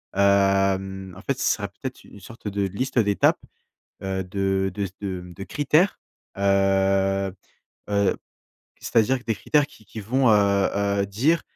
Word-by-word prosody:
hem, 95 Hz, -1 st, +2 dB
en -, -, -10 dB
fait, -, -, -2 dB
ce -, -, 0 dB
serait -, -, -4 dB
peut-être -, -, -8 dB
u -, -, -18 dB
une -, -, -13 dB
sorte 110 Hz, +3 st, -11 dB
de 100 Hz, 0 st, -1 dB
liste 125 Hz, +6 st, -1 dB
d'étapes, 100 Hz, -2 st, +3 dB, 0.6 s
heu, 95 Hz, -1 st, -2 dB
de 95 Hz, 0 st, 0 dB
de 105 Hz, -, -3 dB
s 95 Hz, -, -5 dB
de, 95 Hz, -3 st, -4 dB
mmh, 90 Hz, -1 st, -11 dB
de 95 Hz, -, -7 dB
critères, 150 Hz, -, +1 dB, 0.4 s
heu 95 Hz, 0 st, +2 dB, 0.6 s
heu, 100 Hz, -1 st, +2 dB, 0.6 s
c'est-à-dire 115 Hz, +3 st, +2 dB
q 120 Hz, -, -18 dB
des 115 Hz, -, 0 dB
critères 145 Hz, +7 st, +1 dB
qui 110 Hz, -, -19 dB
qui 110 Hz, -, -8 dB
vont, 125 Hz, +4 st, +1 dB
heu 100 Hz, -2 st, +3 dB
heu, 100 Hz, 0 st, 0 dB
dire 140 Hz, +12 st, +1 dB
100 Hz, 165 wpm, -24 LUFS, 95-110 Hz, 0.6 s, d'étapes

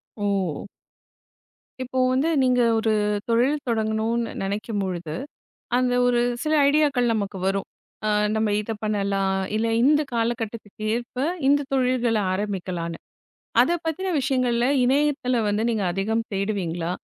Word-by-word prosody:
ஓ! 195 Hz, -7 st, -1 dB, 1.2 s
இப்போ 255 Hz, 0 st, -3 dB
வந்து 275 Hz, +5 st, +2 dB
நீங்க 250 Hz, -1 st, +3 dB, 0.2 s
ஒரு 220 Hz, 0 st, +1 dB, 0.4 s
தொழில் 260 Hz, +6 st, +2 dB
தொடங்கண்ணு 225 Hz, 0 st, 0 dB
நெனைக்கும்பொழுது 195 Hz, -5 st, -3 dB, 0.6 s
அந்த 250 Hz, 0 st, +2 dB
ஒரு 245 Hz, -1 st, +3 dB, 0.2 s
சில 310 Hz, -, -1 dB
ஐடியாக்கள் 280 Hz, -4 st, +3 dB
நமக்கு 200 Hz, -2 st, -3 dB
வரும். 195 Hz, 0 st, 0 dB, 0.4 s
ஆ, -, -, +2 dB, 0.3 s
நம்ம 220 Hz, 0 st, +1 dB
இத 210 Hz, +2 st, -4 dB
பண்ணலாம் 200 Hz, -2 st, 0 dB, 0.2 s
இல்ல 220 Hz, +1 st, +1 dB, 0.2 s
இந்தக் 295 Hz, 0 st, +3 dB
காலகட்டத்துக்கு 225 Hz, -2 st, -3 dB
ஏற்ப 240 Hz, +1 st, -5 dB, 0.3 s
இந்த 285 Hz, 0 st, +3 dB
தொழில்கள 250 Hz, -4 st, +2 dB
ஆரம்பிக்கலான்னு. 185 Hz, -4 st, -3 dB, 0.6 s
அதப் 345 Hz, -1 st, +1 dB
பத்தின 370 Hz, +4 st, -2 dB
விஷயங்கள்ல 255 Hz, -3 st, +1 dB, 0.2 s
இணையத்துல 265 Hz, -2 st, +1 dB
வந்து 205 Hz, +1 st, 0 dB
நீங்க 220 Hz, -3 st, 0 dB
அதிகம் 220 Hz, +5 st, -1 dB
தேடுவீங்களா? 185 Hz, -4 st, -2 dB
225 Hz, 115 wpm, -24 LUFS, 200-255 Hz, 1.2 s, நீங்க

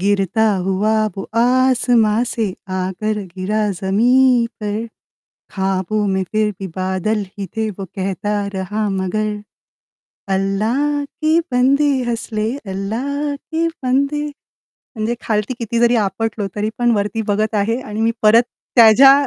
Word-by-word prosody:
गिरता 200 Hz, +2 st, +1 dB, 0.2 s
हुआ 200 Hz, +3 st, +1 dB, 0.2 s
वो 195 Hz, -, -3 dB, 0.2 s
आसमां 245 Hz, -3 st, +3 dB
से, 230 Hz, -1 st, -1 dB, 0.2 s
आकर 190 Hz, +3 st, -2 dB, 0.2 s
गिरा 195 Hz, +4 st, -1 dB, 0.2 s
जमीन 240 Hz, +5 st, +4 dB, 0.2 s
पर, 210 Hz, +2 st, -3 dB, 0.6 s
खाबो 195 Hz, +2 st, -1 dB
में 190 Hz, 0 st, 0 dB
फिर 215 Hz, -1 st, +1 dB
भी 195 Hz, -, -4 dB
बादलही 195 Hz, +2 st, -2 dB
थे 220 Hz, -1 st, 0 dB
वो 195 Hz, -, -4 dB
कहता 195 Hz, +3 st, -3 dB, 0.2 s
रहा 205 Hz, +3 st, -2 dB
मगर, 195 Hz, +3 st, -1 dB, 1.1 s
अल्लाह 230 Hz, +10 st, 0 dB, 0.2 s
के 315 Hz, +1 st, +4 dB, 0.2 s
बंदे 275 Hz, +4 st, +3 dB, 0.2 s
हसले 220 Hz, -2 st, -2 dB, 0.3 s
अल्ला 195 Hz, +5 st, -3 dB, 0.3 s
के 325 Hz, +3 st, -2 dB
बंदे 280 Hz, 0 st, -1 dB, 0.5 s
म्हणजे 225 Hz, 0 st, -4 dB
खालती 210 Hz, +2 st, 0 dB
किती 230 Hz, 0 st, -1 dB
जरी 240 Hz, 0 st, +4 dB
आपटलो, 220 Hz, 0 st, -3 dB
तरी 210 Hz, +3 st, -3 dB
पण 240 Hz, -1 st, +3 dB
वरती 210 Hz, +2 st, -2 dB
बघत 215 Hz, +2 st, 0 dB
आहे 230 Hz, +4 st, -1 dB
आणि 215 Hz, -, -3 dB
मी -, -, +1 dB
परत 220 Hz, +2 st, +6 dB, 0.4 s
त्याच्या 245 Hz, +5 st, +8 dB
215 Hz, 125 wpm, -19 LUFS, 195-240 Hz, 1.1 s, त्याच्या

